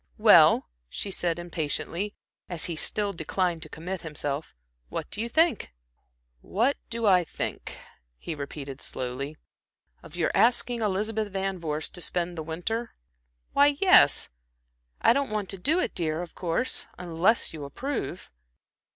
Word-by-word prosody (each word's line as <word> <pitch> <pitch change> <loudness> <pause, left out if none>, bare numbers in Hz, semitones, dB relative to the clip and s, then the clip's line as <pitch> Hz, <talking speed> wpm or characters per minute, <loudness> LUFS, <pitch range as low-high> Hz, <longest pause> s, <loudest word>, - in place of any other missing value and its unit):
"Well," - - +7 0.2
she 200 - -4
said, 175 -2 0
impatiently, 175 +3 -3 0.3
as 175 -3 -1
he 170 - -3
still 205 +5 0
declined 175 0 -1
to 155 - -10
commit 180 +4 -5
himself, 145 - -4 0.3
"what - - -4
do 210 - -4
you 235 - -2
think?" 320 -2 +2 0.7
"What 235 - +1
do 230 0 -2
I 185 -3 +5
think," - - -5 0.4
he 165 - -5
repeated, 140 -2 -7
slowly, 135 +4 -4 0.6
"of 155 - -12
your 175 -2 +1
asking 240 0 +3
Elizabeth 210 +1 -1
Van 195 -1 -2
Vorst 155 -2 -3
to 175 - -5
spend 175 0 -1
the 160 - -4
winter?" 180 +9 -3 0.6
"Why, 285 0 +5
yes, 375 -1 +6 0.7
I - - +6
don't 280 +1 0
want 210 -2 -2
to 195 - -3
do 305 - +2
it, - - -1
dear, 160 0 -1
of 175 - -10
course, 180 +9 -1
unless 180 +6 +2
you 155 -2 -7
approve." 210 - -4
180 Hz, 145 wpm, -27 LUFS, 160-220 Hz, 0.7 s, Well